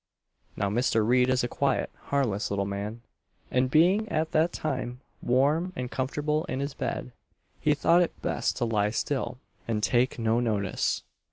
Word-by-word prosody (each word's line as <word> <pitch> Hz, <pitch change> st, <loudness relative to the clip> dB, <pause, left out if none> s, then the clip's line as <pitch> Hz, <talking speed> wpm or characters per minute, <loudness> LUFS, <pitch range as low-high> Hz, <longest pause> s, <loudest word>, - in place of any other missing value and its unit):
Now 100 Hz, -, +1 dB
Mr. 115 Hz, -1 st, +2 dB
Reid 125 Hz, +1 st, +4 dB
is 130 Hz, -1 st, +2 dB
a -, -, +1 dB
quiet, 135 Hz, +2 st, 0 dB
harmless, 120 Hz, -8 st, 0 dB
little 100 Hz, 0 st, 0 dB
man, 100 Hz, +4 st, -5 dB, 0.5 s
and, 125 Hz, 0 st, +2 dB
being 185 Hz, +9 st, +4 dB
at 160 Hz, -3 st, -1 dB
that 160 Hz, +2 st, +3 dB
time 125 Hz, -4 st, -3 dB, 0.2 s
warm 145 Hz, +9 st, +2 dB
and 125 Hz, -5 st, -4 dB
comfortable 150 Hz, +4 st, -1 dB
in 130 Hz, -, -3 dB
his 140 Hz, +1 st, -3 dB
bed, 125 Hz, -, -4 dB, 0.5 s
he 150 Hz, -, +2 dB
thought 170 Hz, +4 st, +4 dB
it 175 Hz, -, -1 dB
best -, -, -1 dB
to -, -, 0 dB
lie 105 Hz, -2 st, +1 dB
still 125 Hz, +1 st, -2 dB, 0.3 s
and 110 Hz, -2 st, -1 dB
take 125 Hz, +3 st, +2 dB
no 115 Hz, 0 st, +2 dB
notice. 105 Hz, -5 st, 0 dB
125 Hz, 165 wpm, -28 LUFS, 115-150 Hz, 0.5 s, Reid